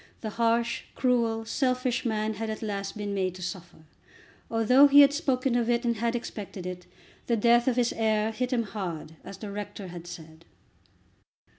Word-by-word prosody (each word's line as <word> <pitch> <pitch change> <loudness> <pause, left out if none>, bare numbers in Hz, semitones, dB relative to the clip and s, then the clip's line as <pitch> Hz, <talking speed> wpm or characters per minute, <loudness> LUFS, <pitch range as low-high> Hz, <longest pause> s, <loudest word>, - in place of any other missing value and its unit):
The 215 - -4
harsh, 235 +1 +1
cruel, 230 -3 +1
selfish 255 +1 0
man 215 -1 -1
had 220 +1 -4
at 220 +1 -5
last 200 -1 -4
been 205 -1 -3
made 185 -2 -1
to 185 - -8
suffer. 175 -3 -7 0.7
Although 250 +5 +6
he 285 +1 +8
had 280 0 +6
spoken 270 -4 0
of 240 -1 +1
it 240 0 +1
and 235 -1 +1
had 235 +2 0
expected 205 -5 -6
it, 180 -1 -6 0.4
the 235 - +2
death 235 +2 +4
of 255 - +3
his 245 -1 +1
heir 220 -1 +1
hit 250 +3 -3
him 240 -2 +1
hard, 180 -7 -5
as 195 0 -9
the 210 -2 -7
rector 205 -1 -6
had 175 0 -9
said. 160 -1 -11
225 Hz, 180 wpm, -27 LUFS, 200-240 Hz, 0.7 s, he